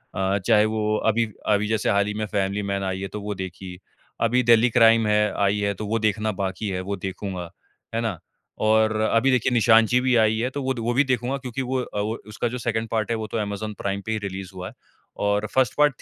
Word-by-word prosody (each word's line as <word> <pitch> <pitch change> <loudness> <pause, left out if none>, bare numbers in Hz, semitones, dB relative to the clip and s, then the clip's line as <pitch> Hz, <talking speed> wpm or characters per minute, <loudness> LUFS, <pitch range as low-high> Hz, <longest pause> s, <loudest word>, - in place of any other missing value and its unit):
अ, 95 +1 +1
चाहे 105 -2 +5
वो 110 0 0 0.2
अभी 115 +2 +1 0.3
अभी 105 +1 +1
जैसे 110 -1 0
हाल 100 0 +3
ही 105 - -2
में 110 +1 -2
फैमिली 100 0 -1
मैन 100 0 -1
आई 95 0 -2
है 100 - -3
तो 105 - -4
वो 105 0 -4
देखी। 95 -1 -7 0.4
अभी 125 +2 +2
दिल्ली 120 0 +5
क्राइम 115 -1 +5
है 105 0 +2
आई 100 +1 +2
है 100 0 0
तो 105 +2 -6
वो 115 +1 0
देखना 110 0 0
बाकी 100 +1 -3
है 90 -1 -2
वो 100 +2 -3
देखूँगा। 95 -2 -5 0.5
है 115 - 0
ना? 110 -8 -3 0.4
और 110 0 +3
अभी 115 +4 +3
देखिए 130 0 +2
निशानची 115 +1 +5
भी 130 -1 +2
आई 110 0 +2
है 125 +3 0
तो 140 +1 -5
वो 130 0 0
द 120 - -7
वो 115 +1 -1
भी 135 +4 +4
देखूँगा 130 0 -1
क्योंकि 130 0 -5
वो 130 +1 -1
अ, 105 - -5
वो 110 +2 -1
उसका 110 +3 -2
जो 125 +2 -4
2nd 115 -2 -2
पार्ट 110 0 -1
है - - +1
वो 110 -1 -4
तो 115 - -4
अमेज़न 105 0 -3
प्राइम 100 0 -2
पे 110 - -3
ही 110 - 0
रिलीज़ 95 -1 -7
हुआ 90 0 -6
है। - - -10 0.5
और 105 +1 +1
1st 130 -2 +2
पार्ट 145 -4 +3
110 Hz, 245 wpm, -24 LUFS, 100-115 Hz, 0.5 s, चाहे